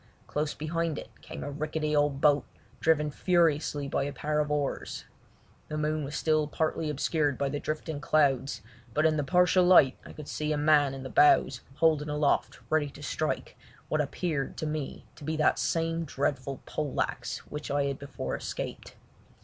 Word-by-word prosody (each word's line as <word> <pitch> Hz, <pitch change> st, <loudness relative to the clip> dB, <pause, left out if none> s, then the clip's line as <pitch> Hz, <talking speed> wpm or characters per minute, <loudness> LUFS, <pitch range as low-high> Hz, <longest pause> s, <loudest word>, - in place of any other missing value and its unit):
Close 150 Hz, 0 st, -2 dB
behind 160 Hz, 0 st, -2 dB
it -, -, -8 dB
came -, -, -8 dB
a 145 Hz, -, -4 dB
rickety 155 Hz, +1 st, -2 dB
old 145 Hz, -2 st, +2 dB
boat, 145 Hz, -1 st, +5 dB, 0.4 s
driven 150 Hz, -2 st, +2 dB
furiously 155 Hz, -4 st, +1 dB
by 140 Hz, -, 0 dB
a 140 Hz, +1 st, -2 dB
pair 150 Hz, +1 st, -1 dB
of 150 Hz, -1 st, 0 dB
oars. 145 Hz, -2 st, -2 dB, 0.6 s
The 155 Hz, -, -4 dB
moon 155 Hz, 0 st, 0 dB
was 145 Hz, +2 st, -5 dB
still 155 Hz, -1 st, +2 dB
partly 155 Hz, +1 st, -1 dB
obscured 145 Hz, -1 st, 0 dB
by 140 Hz, -, 0 dB
the 145 Hz, +1 st, -3 dB
drifting 155 Hz, -1 st, -4 dB
clouds, 135 Hz, -7 st, +2 dB, 0.3 s
but 155 Hz, -, +3 dB
in 160 Hz, -1 st, +4 dB
the 150 Hz, -, 0 dB
partial 180 Hz, +3 st, +4 dB
light 175 Hz, -8 st, +6 dB
I -, -, -11 dB
could 150 Hz, -2 st, -9 dB
see 155 Hz, 0 st, -2 dB
a 150 Hz, -, +1 dB
man 145 Hz, -2 st, +4 dB
in 135 Hz, -, -7 dB
the 130 Hz, -, -6 dB
bows 135 Hz, -3 st, +5 dB
holding 155 Hz, -1 st, +2 dB
aloft 150 Hz, -1 st, +1 dB
ready 155 Hz, -2 st, +2 dB
to 145 Hz, +1 st, -12 dB
strike 155 Hz, +1 st, -2 dB, 0.3 s
what 155 Hz, -, +2 dB
appeared 150 Hz, -1 st, -2 dB
to -, -, -3 dB
me 150 Hz, -2 st, -4 dB
to 150 Hz, -, -12 dB
be 155 Hz, +2 st, -2 dB
that 155 Hz, -, +3 dB
same 165 Hz, 0 st, 0 dB
dreadful 140 Hz, -2 st, -2 dB
pole 150 Hz, -3 st, -3 dB
axe -, -, -2 dB
which 150 Hz, 0 st, -5 dB
I 145 Hz, 0 st, +1 dB
had 140 Hz, -1 st, -2 dB
before 140 Hz, 0 st, -4 dB
escaped. -, -, -6 dB
150 Hz, 180 wpm, -29 LUFS, 145-155 Hz, 0.6 s, light